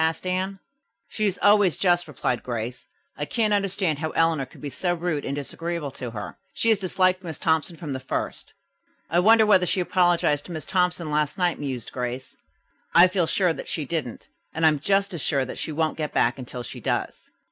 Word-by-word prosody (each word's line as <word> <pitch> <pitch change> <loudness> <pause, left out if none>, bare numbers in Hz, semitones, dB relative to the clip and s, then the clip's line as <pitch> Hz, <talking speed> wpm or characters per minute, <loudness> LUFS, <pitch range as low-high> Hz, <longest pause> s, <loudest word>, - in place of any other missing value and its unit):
asked 160 +2 -1
Anne. 185 +2 -1 0.5
"She 215 -1 0
is 195 - -1
always 205 -4 +5
just," 175 -2 +2
replied 125 -4 -2
Grace. 120 0 -5 0.3
"I 145 - -3
can't 215 +4 +1
understand 195 -6 0
how 160 0 -2
Eleanor 160 -5 +2
could - - -17
be 145 - -6
so 175 +3 -1
rude 165 -4 -2
and 140 - -3
disagreeable 165 +1 -4
to 125 -1 -6
her. 105 -3 -7 0.2
She 230 - +1
has 220 -3 +4
disliked 185 0 +1
Miss 160 -5 -6
Thompson 160 +1 0
from 150 -3 -5
the 130 - -3
first." 130 - -4 0.6
"I 170 - +4
wonder 220 +4 +6
whether 185 -4 +4
she 190 - +1
apologized 175 -5 +2
to - - -9
Miss 155 - -6
Thompson 180 -3 0
last 150 -1 0
night," 180 -3 +1
mused 130 -5 -4
Grace. 125 +1 -5 0.6
"I 175 +2 +9
feel 180 -3 +1
sure 180 -2 +2
that - - -8
she 155 - -2
didn't, 140 -6 -4 0.3
and 160 0 +2
I - - +8
am 150 -2 0
just 195 +5 +1
as 170 - -4
sure 135 -2 +1
that 130 - -7
she - - -3
won't 155 +1 -1
get 150 -1 -3
back 125 +3 +2
until 125 -1 -6
she - - -7
does." - - -3
165 Hz, 210 wpm, -25 LUFS, 145-185 Hz, 0.6 s, I